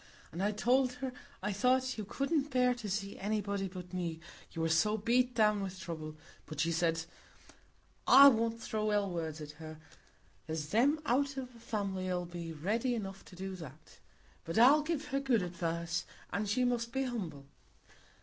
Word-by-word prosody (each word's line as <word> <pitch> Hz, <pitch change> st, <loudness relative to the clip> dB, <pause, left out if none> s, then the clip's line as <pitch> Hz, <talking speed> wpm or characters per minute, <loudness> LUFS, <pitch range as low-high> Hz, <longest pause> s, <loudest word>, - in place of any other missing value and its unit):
And 170 Hz, -, -4 dB
I 205 Hz, +2 st, +2 dB
told 250 Hz, +4 st, +2 dB
her 260 Hz, 0 st, -5 dB, 0.3 s
I 210 Hz, 0 st, 0 dB
thought 255 Hz, +5 st, +2 dB
you 215 Hz, -, -5 dB
couldn't 275 Hz, +6 st, 0 dB
bear 250 Hz, -2 st, +3 dB
to 235 Hz, -4 st, -6 dB
see 200 Hz, 0 st, -3 dB
anybody 200 Hz, -1 st, -1 dB
but 180 Hz, -1 st, -9 dB
me, 170 Hz, -3 st, -3 dB, 0.3 s
you 165 Hz, -, -3 dB
were -, -, +2 dB
so 210 Hz, +7 st, +3 dB
beat 245 Hz, +3 st, +2 dB
down 210 Hz, -2 st, +3 dB
with 190 Hz, -1 st, -5 dB
trouble; 160 Hz, -3 st, -6 dB, 0.3 s
but 155 Hz, -, -7 dB
she 165 Hz, +3 st, +2 dB
said, 165 Hz, -1 st, +1 dB, 1.0 s
'I 280 Hz, +1 st, +10 dB
won't 230 Hz, -2 st, 0 dB
throw 215 Hz, -1 st, -1 dB
ill 205 Hz, -2 st, +1 dB
words 160 Hz, -2 st, -4 dB
at 150 Hz, 0 st, -7 dB
her; 155 Hz, 0 st, -8 dB, 0.7 s
there's 155 Hz, -2 st, -3 dB
them 270 Hz, -, +3 dB
out 275 Hz, +2 st, +1 dB
o' 265 Hz, -, -2 dB
th' 245 Hz, -2 st, -16 dB
family 195 Hz, -5 st, -2 dB
'ull 180 Hz, -1 st, -1 dB
be 170 Hz, -1 st, -6 dB
ready 220 Hz, -, 0 dB
enough 195 Hz, -3 st, -5 dB
to 185 Hz, -, -13 dB
do 190 Hz, +1 st, -5 dB
that. 155 Hz, -2 st, -12 dB, 0.4 s
But 165 Hz, -, -4 dB
I'll 270 Hz, +6 st, +7 dB
give 305 Hz, -1 st, -3 dB
her 275 Hz, -, 0 dB
good 255 Hz, -7 st, +2 dB
advice; 170 Hz, -1 st, -2 dB, 0.3 s
an' 205 Hz, +3 st, -1 dB
she 230 Hz, +5 st, +1 dB
must 240 Hz, -1 st, 0 dB
be 270 Hz, +1 st, 0 dB
humble. 180 Hz, -, -4 dB
205 Hz, 180 wpm, -33 LUFS, 170-245 Hz, 1.0 s, I